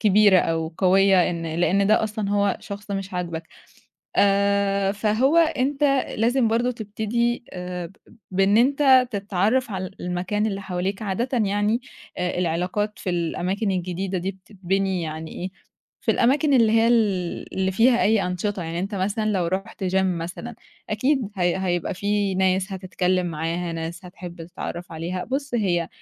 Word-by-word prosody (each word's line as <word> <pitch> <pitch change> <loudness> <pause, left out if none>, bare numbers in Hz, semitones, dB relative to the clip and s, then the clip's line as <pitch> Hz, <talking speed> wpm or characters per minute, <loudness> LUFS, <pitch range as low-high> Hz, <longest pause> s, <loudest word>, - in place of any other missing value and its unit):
كبيرة 205 -2 +6
أو 165 -1 -1
قوية 190 -1 +4
إن 165 -1 -4
لإن 185 +4 +2
ده 215 +1 +4
أصلًا 215 -1 -3
هو 200 -1 +2
شخص 205 +1 -8
مش 195 -1 -4
عاجبك. 170 -2 -4 0.7
آآ 200 0 +3
فهو 220 +9 +2
أنت 290 -3 +2 0.3
لازم 235 +2 +2
برضه 235 +2 +1
تبتدي 235 +2 -2
آآ 180 -1 -5
ب 195 - -18 0.3
بإن 195 +2 +3
أنت 260 0 +5
تتعرّف 205 +4 0
على 185 -2 -4
المكان 185 +4 -1
اللي 200 -2 -2
حواليك 190 +2 -3
عادةً 215 +5 -1 0.2
يعني 205 +4 +1 0.4
آآ 180 0 -1
العلاقات 180 +5 -1
في 185 - -2
الأماكن 180 +4 -1
الجديدة 185 +1 -2
دي 190 +3 -2
بتتبني 190 -1 -2
يعني 160 0 -5
إيه، 185 +2 -5 0.5
في - - +1
الأماكن 280 +4 +3
اللي 225 -3 +5
هي 225 0 +4
ال 200 -7 0
اللي 190 0 +1
فيها 240 +4 +4
أي 215 -2 +3
أنشطة، 180 +1 -2
يعني 165 +1 -4
أنت 195 +3 -3
مثلًا 205 +3 0
لو 185 -4 0
رُحت 195 +3 -3
gym 185 +1 0
مثلًا 180 +6 -3 0.4
أكيد 255 +1 +1
هي 175 -1 +1
هيبقى 180 0 -1
في 200 0 0
ناس 190 +1 +1
هتتكلِّم 185 -1 0
معاها، 165 +1 -3
ناس 165 +3 -5
هتحِب 175 -2 -9
تتعرّف 175 0 -7
عليها، 175 +3 -4
بُص، 275 0 -3
هي 175 -7 +1
195 Hz, 150 wpm, -23 LUFS, 180-215 Hz, 0.7 s, كبيرة